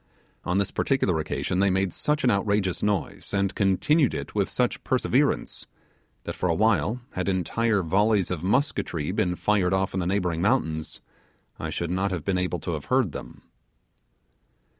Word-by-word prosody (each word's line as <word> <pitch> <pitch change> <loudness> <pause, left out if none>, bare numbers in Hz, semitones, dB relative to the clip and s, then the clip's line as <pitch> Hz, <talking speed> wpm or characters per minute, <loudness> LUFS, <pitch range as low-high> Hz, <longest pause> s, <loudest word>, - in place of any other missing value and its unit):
On 90 +1 0
this 100 -1 0
particular 100 - +1
occasion 90 +3 -2
they 100 0 +4
made 95 -1 0
such 150 0 0
an 125 - +4
outrageous 100 -2 0
noise, 100 -1 -2
and 100 -1 +1
continued 120 - +2
it - - -5
with - - 0
such - - -1
perseverance, - - 0 0.6
that - - -4
for 90 - -1
awhile, 110 +5 +2
had 95 +1 -2
entire 100 +3 +1
volleys 100 +2 +2
of 85 -4 -2
musketry 95 - 0
been 95 -3 0
fired 95 -2 +1
off 95 0 -1
in 95 - -1
the 90 - -1
neighbouring 90 -4 0
mountains, 80 -8 0 0.6
I - - -3
should 85 0 -3
not 95 +2 0
have 90 -5 -4
been 95 -2 +1
able 90 -1 -1
to 85 - -3
have 75 -3 -4
heard 130 -8 +2
them. - - -9
95 Hz, 165 wpm, -26 LUFS, 90-105 Hz, 0.6 s, they